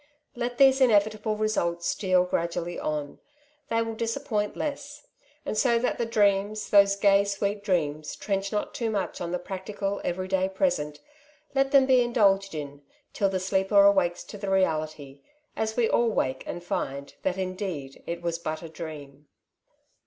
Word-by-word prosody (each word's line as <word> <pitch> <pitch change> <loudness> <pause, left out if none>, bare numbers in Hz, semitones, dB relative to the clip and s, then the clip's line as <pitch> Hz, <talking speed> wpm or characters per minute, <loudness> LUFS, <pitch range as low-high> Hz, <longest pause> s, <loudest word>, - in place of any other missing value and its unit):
Let 240 0 -3
these 270 0 +5
inevitable 215 -2 +3
results 175 -6 -1
steal 185 -2 +2
gradually 170 0 -2
on; 150 -2 -3 0.5
they 230 - -1
wiH 225 -1 -1
dis 230 0 -1
appoint 215 -7 -2
less; 290 0 -5 0.4
and - - -2
so 235 +2 +3
that 240 - -1
the 235 - 0
dreauMT, 205 -1 +1
those 200 -1 +6
gay, 200 0 +4
sweet 200 0 -2
dreams, 155 -6 -1
trench 195 -1 -2
not 210 - -2
too 230 -2 -2
much 205 -3 -3
on 170 -1 -3
the 180 - 0
practical 195 +2 -4
every 185 +1 -2
day 190 0 +1
present, 150 - -1 0.5
let 270 0 +2
them 275 -1 +6
be 260 -1 +5
indulged 200 -6 +2
in, 145 -1 -6 0.3
till 200 - +1
the 190 -1 -1
sleeper 190 +2 +3
awakes 190 -3 +3
to 205 - -10
the 200 -1 -4
reality, 155 -7 -1 0.3
as 220 +1 -2
we 235 -2 +3
all 235 - +2
awake 130 - -1
and 175 - -5
find 140 -5 -4
that 190 -1 -1
indeed 185 -7 -4
it 170 0 -4
was 170 -1 -2
but 155 0 -4
a 165 - -7
dream. 150 -3 -9
195 Hz, 165 wpm, -27 LUFS, 170-215 Hz, 0.5 s, those